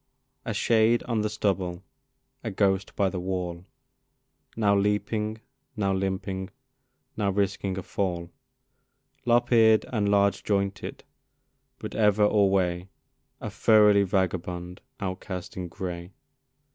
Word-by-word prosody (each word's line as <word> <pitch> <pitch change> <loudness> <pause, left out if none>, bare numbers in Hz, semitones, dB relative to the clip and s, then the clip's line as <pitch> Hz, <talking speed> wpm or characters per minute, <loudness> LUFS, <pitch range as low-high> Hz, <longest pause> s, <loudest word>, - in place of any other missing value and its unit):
A - - -2
shade 115 +1 +3
on 115 -3 -1
the 105 - 0
stubble, 95 -4 -1 0.6
a 115 - -2
ghost 95 -1 0
by 100 - +2
the 95 -1 -3
wall, 90 -1 -4 0.9
Now 105 -2 +3
leaping, 105 +2 0 0.4
now 100 -2 +1
limping, 95 0 -2 0.7
now 105 -2 0
risking 100 -1 -1
a 95 - -4
fall, 90 -3 -3 1.0
Lop 120 +1 +3
eared 110 -2 +5
and 105 -3 +1
large 100 0 +3
jointed, 100 -1 -2 0.7
but - - -7
ever 105 -1 +3
alway 95 -3 +2 0.5
A - - -5
thoroughly 105 -2 +5
vagabond 90 -2 -2 0.2
outcast 95 -2 -5
in 90 -1 -4
gray. 85 0 -6
100 Hz, 115 wpm, -27 LUFS, 95-105 Hz, 1.0 s, eared